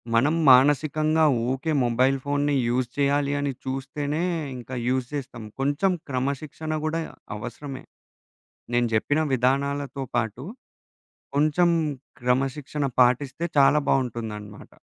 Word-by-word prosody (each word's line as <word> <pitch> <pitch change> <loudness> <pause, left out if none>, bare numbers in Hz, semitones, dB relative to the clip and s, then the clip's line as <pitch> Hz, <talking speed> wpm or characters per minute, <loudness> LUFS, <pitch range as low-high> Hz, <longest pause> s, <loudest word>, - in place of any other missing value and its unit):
మనం 145 +8 +3 0.2
మానసికంగా 155 +4 +4 0.3
ఊకే 145 +4 -1
మొబైల్ 130 +3 +2
ఫోన్‌ని 145 0 +1
యూజ్ 120 0 0
చెయ్యాలి 140 0 +2
అని 140 -1 -1
చూస్తేనే 140 +4 -3 0.3
ఇంక 125 +1 -10 0.2
యూజ్ 130 0 +1
చేస్తాం. 125 -6 -5 0.2
కొంచెం 145 +8 +2 0.2
క్రమశిక్షణ 140 +4 -3
గూడా 165 +1 -1 0.4
అవసరమే. 130 +4 -7 0.9
నేను 120 0 +3
జెప్పిన 145 +7 +1
విధానాలతో 140 +2 0
పాటు, 115 +2 -2 0.9
కొంచెం 155 +4 +3 0.5
క్రమశిక్షణ 135 +4 -1 0.2
పాటిస్తే 130 +6 +1
చాలా 140 +2 +6
బావుంటుందనమాట. 110 -5 -3
135 Hz, 100 wpm, -25 LUFS, 125-145 Hz, 0.9 s, చాలా